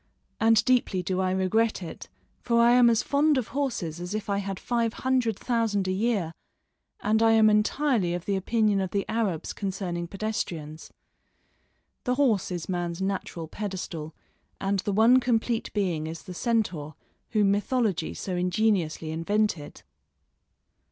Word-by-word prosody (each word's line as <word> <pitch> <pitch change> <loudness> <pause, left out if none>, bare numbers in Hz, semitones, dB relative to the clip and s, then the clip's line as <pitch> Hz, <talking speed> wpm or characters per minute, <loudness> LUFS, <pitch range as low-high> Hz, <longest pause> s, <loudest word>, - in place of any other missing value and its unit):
and 225 -1 +4
deeply 240 -7 +2
do 185 +1 -1
I 185 - +1
regret 190 +3 +1
it, 165 - -9 0.3
for 235 -1 +2
I 235 +1 +6
am 245 -1 +6
as 230 -1 +2
fond 290 +1 +2
of 250 - -2
horses 200 - -3
as 180 +4 -4
if 210 -1 -3
I 200 - +1
had 195 -1 -4
five 235 -2 0
hundred 250 -5 0
thousand 225 -5 0
a - - +1
year, 195 -4 0 0.7
and 220 +1 +2
I 225 0 +5
am 220 -1 +6
entirely 210 -3 +1
of 175 - -6
the 200 - 0
opinion 210 +1 +1
of 190 - -2
the 200 +1 -1
Arabs 205 -8 -1
concerning 185 -3 -3
pedestrians. 170 -6 -4 1.1
The 250 - +1
horse 250 -8 +2
is 175 -3 -4
man's 175 -2 -3
natural 190 -4 -3
pedestal, 175 -5 -5 0.4
and 195 0 0
the 205 - -2
one 225 +5 +5
complete 235 -2 0
being 175 -7 -1
is 165 +1 -7
the 185 - -8
centaur, 180 - -1 0.3
whom 210 -3 +3
mythology 205 -4 0
so 185 - -4
ingeniously 180 -3 0
invented. 170 -1 -1
200 Hz, 150 wpm, -27 LUFS, 180-225 Hz, 1.1 s, I